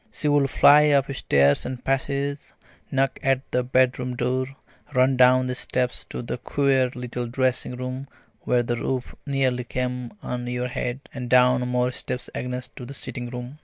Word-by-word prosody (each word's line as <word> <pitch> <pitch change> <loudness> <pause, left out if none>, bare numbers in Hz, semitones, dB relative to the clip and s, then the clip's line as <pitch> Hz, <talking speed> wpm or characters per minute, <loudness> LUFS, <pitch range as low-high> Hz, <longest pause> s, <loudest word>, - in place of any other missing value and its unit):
She 150 - -2
would 145 -2 +3
fly 150 +3 +6
up 140 -1 +2
stairs 70 - +3
and 125 -1 -6
passages, 140 +1 -2 0.3
knock 135 -1 0
at 135 -1 +2
the 125 - +1
bedroom 125 0 +1
door, 130 +2 0 0.5
run 130 +1 +4
down 130 0 +5
the 125 - -2
steps 125 0 -2
to - - -5
the 120 - -4
queer 135 -1 +2
little 125 -1 -4
dressing 130 0 0
room 130 +2 -5 0.3
where 120 -1 +1
the 120 0 -2
roof 130 +1 -3
nearly 130 -3 +1
came 125 0 -3
on 125 0 -4
your 125 0 -2
head, 125 +1 -3
and 125 -2 -5
down 125 0 +4
more 125 0 +1
steps 125 0 -5
again 125 0 -3 0.2
to - - -7
the 140 - -7
sitting 120 -3 -6
room. 125 +4 -7
125 Hz, 170 wpm, -24 LUFS, 125-135 Hz, 0.5 s, fly